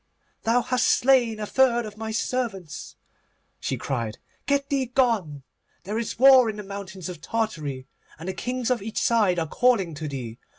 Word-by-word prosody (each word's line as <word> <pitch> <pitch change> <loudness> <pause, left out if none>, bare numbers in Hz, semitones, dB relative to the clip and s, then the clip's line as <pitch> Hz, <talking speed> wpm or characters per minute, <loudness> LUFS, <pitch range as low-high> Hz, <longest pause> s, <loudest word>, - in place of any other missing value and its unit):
'Thou 235 +2 +2
hast 255 0 +1
slain 245 -4 +3
a 210 - -2
third 240 0 +3
of 210 - -8
my 220 +1 -5
servants,' 215 -6 -3 0.6
she - - -2
cried, 115 -5 -3 0.3
'get 280 -1 +1
thee 270 -3 0
gone. 225 - 0 0.4
There 210 +5 -3
is 230 - -4
war 260 -2 +7
in 215 - -4
the 210 - -7
mountains 195 -2 -7
of 180 -2 -7
Tartary, 155 -13 -3 0.3
and 165 +3 -9
the 190 - -2
kings 250 +6 -2
of 245 -4 +1
each 220 +2 -3
side 210 -6 +3
are 165 - 0
calling 210 -4 +2
to 155 +1 -5
thee. 125 -4 -6
220 Hz, 175 wpm, -25 LUFS, 175-245 Hz, 0.6 s, war